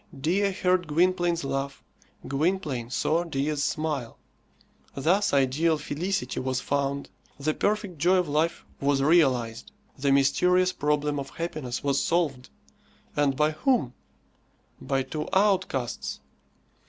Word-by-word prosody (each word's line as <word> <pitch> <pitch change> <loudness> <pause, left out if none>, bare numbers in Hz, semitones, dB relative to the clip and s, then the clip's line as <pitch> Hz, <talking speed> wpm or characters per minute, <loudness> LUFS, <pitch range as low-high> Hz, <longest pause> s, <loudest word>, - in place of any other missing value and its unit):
Dea 190 +8 +1
heard 185 -2 +1
Gwynplaine's 175 +1 +2
laugh; 135 0 -3 0.4
Gwynplaine 140 -5 -1
saw 160 +6 +1
Dea's 145 -2 -1
smile. 150 -7 -2 0.8
Thus 185 +9 +2
ideal 145 +4 +2
felicity 150 -1 -2
was 130 -1 -1
found, 140 +1 -2 0.3
the 155 +2 0
perfect 205 -4 -1
joy 180 +5 +4
of 180 -2 +1
life 155 +3 0
was 140 -1 +1
realized, 130 -8 +2 0.3
the 140 +1 +2
mysterious 180 +7 +3
problem 150 -2 0
of 135 -1 -6
happiness 155 -7 -4
was 140 -1 +1
solved; 150 -7 0 0.7
and 145 -2 +2
by 150 +3 +2
whom? 220 - +1 0.9
By 135 -1 0
two 150 +3 -5
outcasts. 190 - 0
150 Hz, 115 wpm, -26 LUFS, 135-175 Hz, 0.9 s, joy